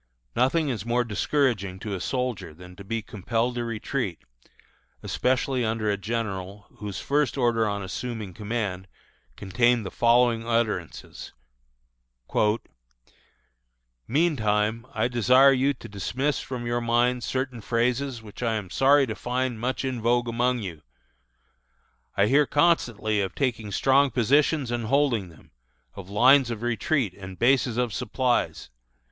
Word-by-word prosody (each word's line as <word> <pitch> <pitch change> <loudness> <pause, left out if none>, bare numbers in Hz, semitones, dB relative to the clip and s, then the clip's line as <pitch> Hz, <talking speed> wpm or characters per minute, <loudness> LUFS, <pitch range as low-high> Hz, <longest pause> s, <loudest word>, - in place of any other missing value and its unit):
Nothing 140 +5 +2
is 110 -7 -3
more 120 +2 +1
discouraging 110 -4 0
to 105 -2 -4
a 95 - -4
soldier 125 - -3
than 90 +2 -13
to 100 - -11
be 115 +2 -3
compelled 115 +4 -2
to 120 -1 -3
retreat, 115 - -3 0.9
especially 130 0 0
under 110 -1 0
a - - +1
general 100 -2 -4
whose 105 -3 -5
first 145 0 0
order 115 -3 +2
on 100 -1 -3
assuming 105 0 -5
command 105 -4 -3 0.5
contained 120 +3 +1
the 95 - -5
following 120 -1 +3
utterances: 115 -7 -3 2.7
"Meantime, 115 -6 +1
I 110 +1 0
desire 125 +3 +5
you 135 +2 +2
to - - -11
dismiss 125 +8 -2
from 125 -2 -6
your 120 0 -1
minds 120 +1 +1
certain 130 -2 -3
phrases 120 +2 -1
which 105 +1 -11
I 115 -2 0
am 100 -4 -5
sorry 140 +4 +4
to 110 - -4
find 125 0 -2
much 130 +3 -2
in 130 -3 -3
vogue 120 +1 +2
among 120 0 0
you. 85 -6 -7 1.4
"I 100 - +5
hear 140 +5 +4
constantly 120 -10 +2
of 95 -1 -3
taking 115 -6 -2
strong 135 +5 +3
positions 135 +2 +2
and 120 -2 -2
holding 125 -7 +1
them 80 - -19 0.4
of 95 -1 -10
lines 130 +5 +5
of 115 -1 -5
retreat 120 - 0
and 95 -1 -9
of - - -15
bases 125 -1 +2
of 125 -3 0
supplies. 120 - -1
120 Hz, 140 wpm, -25 LUFS, 105-130 Hz, 2.7 s, desire